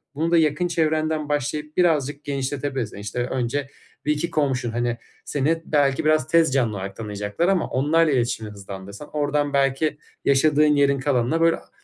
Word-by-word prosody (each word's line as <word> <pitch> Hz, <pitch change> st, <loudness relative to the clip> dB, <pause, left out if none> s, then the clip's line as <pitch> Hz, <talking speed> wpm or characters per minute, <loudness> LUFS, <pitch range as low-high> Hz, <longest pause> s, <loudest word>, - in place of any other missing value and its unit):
Bunu 165 Hz, +3 st, -1 dB
da 170 Hz, -, +5 dB
yakın 155 Hz, +2 st, +2 dB
çevrenden 155 Hz, -2 st, 0 dB
başlayıp 150 Hz, +1 st, -2 dB
birazcık 150 Hz, -5 st, +1 dB
genişletebilirsin. 135 Hz, -4 st, -3 dB
İşte, 100 Hz, +4 st, -5 dB
önce 130 Hz, +2 st, -2 dB, 0.4 s
1-2 150 Hz, +3 st, 0 dB
komşun, 135 Hz, -5 st, 0 dB
hani, 120 Hz, 0 st, -1 dB, 0.3 s
seni 155 Hz, +4 st, 0 dB
belki 145 Hz, -1 st, +1 dB
biraz 155 Hz, -4 st, +3 dB
tez 165 Hz, -3 st, +3 dB
canlı 120 Hz, -6 st, +1 dB
olarak 95 Hz, 0 st, -6 dB
tanıyacaklar 105 Hz, -, -2 dB
ama 190 Hz, -2 st, +2 dB
onlarla 155 Hz, +4 st, +2 dB
iletişimi 120 Hz, -4 st, -1 dB
hızlandırsan 100 Hz, +4 st, -9 dB
oradan 145 Hz, -1 st, 0 dB
belki 140 Hz, +2 st, +1 dB, 0.3 s
yaşadığın 145 Hz, +2 st, +4 dB
yerin 140 Hz, -1 st, +3 dB
kalanına 135 Hz, +4 st, +1 dB
böyle 165 Hz, 0 st, +4 dB
ha -, -, -15 dB
145 Hz, 150 wpm, -23 LUFS, 125-155 Hz, 0.4 s, da